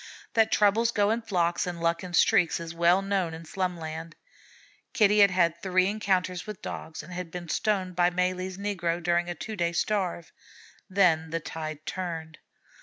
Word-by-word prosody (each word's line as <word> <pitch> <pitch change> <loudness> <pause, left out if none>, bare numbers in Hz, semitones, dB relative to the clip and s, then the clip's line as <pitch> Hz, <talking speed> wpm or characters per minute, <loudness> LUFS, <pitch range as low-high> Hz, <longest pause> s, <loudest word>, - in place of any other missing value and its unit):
That 225 -1 +3
troubles 215 +3 +3
go 205 -2 +2
in 230 +1 0
flocks 175 -6 0
and 175 -1 -4
luck 170 +1 0
in 180 -1 -4
streaks, 180 -3 +4
is 165 0 -6
well 170 +3 +3
known 190 -5 -1
in 165 +1 -10
Slumland. 165 -2 -4 0.8
Kitty 210 -4 +4
had 200 -1 +8
had 170 -2 +1
three 185 0 +2
encounters 190 -3 -1
with 210 -3 -8
Dogs, 160 0 -6
and 180 - -10
had 180 -1 -5
been 175 0 -7
stoned 190 -3 0
by 175 0 +4
Malee's 185 +1 -1
negro 185 -4 -1
during 175 +1 +1
a 175 - -3
two 220 +6 -6
days' 170 -2 -1
starve. 185 -5 -2 0.6
Then 175 -5 +3
the 165 +1 -2
tide 155 -1 -6
turned. 165 -4 -5
180 Hz, 175 wpm, -27 LUFS, 170-195 Hz, 0.8 s, had